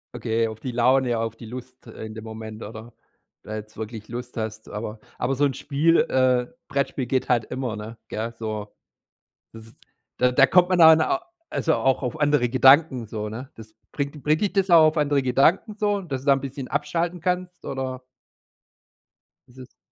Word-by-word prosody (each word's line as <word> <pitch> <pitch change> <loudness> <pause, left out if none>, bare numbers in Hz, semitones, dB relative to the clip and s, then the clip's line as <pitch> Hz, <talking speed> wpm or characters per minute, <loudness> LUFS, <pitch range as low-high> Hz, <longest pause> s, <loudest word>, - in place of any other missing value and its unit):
Okay, 115 0 0
auf 110 0 -8
die 130 - -4
Laune, 125 0 +2
auf 115 0 -3
die 115 - -11
Lust, 125 +2 -10
äh, 110 -1 -8
in 110 0 -9
dem 110 - -8
Moment 110 0 -8
oder 110 +2 -9
ob 120 - -20 0.5
du - - -14
da 110 - -4
jetzt 110 0 -8
wirklich 110 0 -7
Lust 125 +1 -7
hast, 110 -1 -5
aber 105 +1 -6 0.2
aber 135 +2 -1
so 145 - 0
'n 140 - 0
Spiel 155 +6 +2
äh, 125 -1 +2 0.2
Brettspiel 140 -1 -1
geht 130 +1 0
halt 120 -3 +2
immer, 125 -3 -4
ne? 110 +2 -8
Gell? 115 +2 -4
So, 110 -2 -5 0.8
das 110 0 -12
ist - - -20 0.4
da 125 0 +3
da 135 +2 +6
kommt 180 +4 +4
man 185 -1 +2
dann 160 -1 +8
au - - +1 0.3
also, 160 - +1
auch 135 0 +1
auf 140 +5 -4
andere 145 -4 +3
Gedanken 135 0 +5
so, 105 -1 -4
ne? 120 +5 -8
Das 110 -1 -13 0.2
bringt 140 0 -4
bringt 155 +1 +2
dich 205 - 0
das 195 -1 +1
auch 170 -2 +8
auf 155 - -2
andere 145 -2 +2
Gedanken 140 - +2
so? 205 -1 0
Dass 135 -7 -5
du - - -14
da 140 - +6
ein 135 - +2
bisschen 135 0 -6
abschalten 170 +4 -2
kannst, 180 0 -2
oder? 130 -1 -4 1.5
Ist 125 - -20
es 130 0 -13
130 Hz, 200 wpm, -24 LUFS, 115-145 Hz, 1.5 s, dann